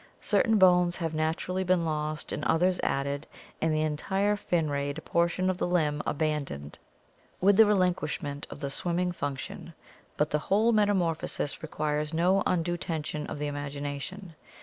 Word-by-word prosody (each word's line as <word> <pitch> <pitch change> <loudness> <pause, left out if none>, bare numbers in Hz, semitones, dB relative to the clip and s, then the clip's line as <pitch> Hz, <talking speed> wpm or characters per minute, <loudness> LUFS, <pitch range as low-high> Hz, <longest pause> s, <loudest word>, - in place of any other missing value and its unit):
Certain 225 -3 +3
bones 180 -2 +5
have 165 -3 -2
naturally 160 +4 -1
been 180 -2 +2
lost 155 -1 -2
and 150 - -3
others 180 +2 +2
added, 140 +1 -1 0.3
and 160 - +2
the 155 0 +1
entire 190 +7 0
fin 175 -5 0
rayed 140 +1 -2
portion 170 +2 +1
of 185 -1 0
the - - 0
limb 155 -4 +1
abandoned 140 - -2 0.6
with 200 +2 +5
the 220 +1 +7
relinquishment 175 -7 0
of - - -9
the 140 -2 -3
swimming 175 +4 -1
func 145 -5 -3
tion; 165 +4 -8 0.4
but 150 +1 +1
the 150 - +2
whole 210 +8 +2
metamorphosis 190 -9 0
requires 150 0 -2
no 185 +4 +3
undue 175 0 0
tension 155 -3 -4
of - - -5
the 150 - -3
imagination. 145 +5 -5
160 Hz, 155 wpm, -28 LUFS, 150-180 Hz, 0.6 s, the